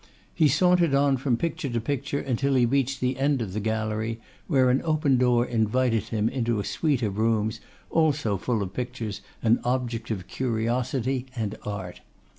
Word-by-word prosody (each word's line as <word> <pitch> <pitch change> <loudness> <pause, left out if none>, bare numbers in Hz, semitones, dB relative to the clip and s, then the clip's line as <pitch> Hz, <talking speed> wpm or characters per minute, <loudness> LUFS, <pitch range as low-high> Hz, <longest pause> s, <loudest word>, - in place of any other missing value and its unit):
He 155 - +4
sauntered 175 0 +3
on 140 -1 +3
from 130 -2 0
picture 150 -1 -2
to 120 -1 -1
picture 140 +3 -2
until 135 +2 0
he 125 -2 +4
reached 135 +1 0
the 130 +1 0
end 140 0 +2
of 105 -6 -4
the 105 - -1
gallery, 110 +1 -2 0.3
where 130 -6 +4
an 130 - +2
open 155 -4 +2
door 125 -1 +3
invited 115 -1 +1
him 110 -1 0
into 120 -3 0
a - - -1
suite 145 -6 0
of 105 -1 -2
rooms 110 0 +1 0.3
also 150 -9 +2
full 110 +1 -1
of 95 - -6
pictures 120 -5 -4 0.2
and 115 +1 +4
objects 120 -2 -2
of 95 -5 -3
curiosity 125 +2 -1
and 110 -3 -2
art. 95 -4 -5
120 Hz, 175 wpm, -26 LUFS, 110-135 Hz, 0.3 s, He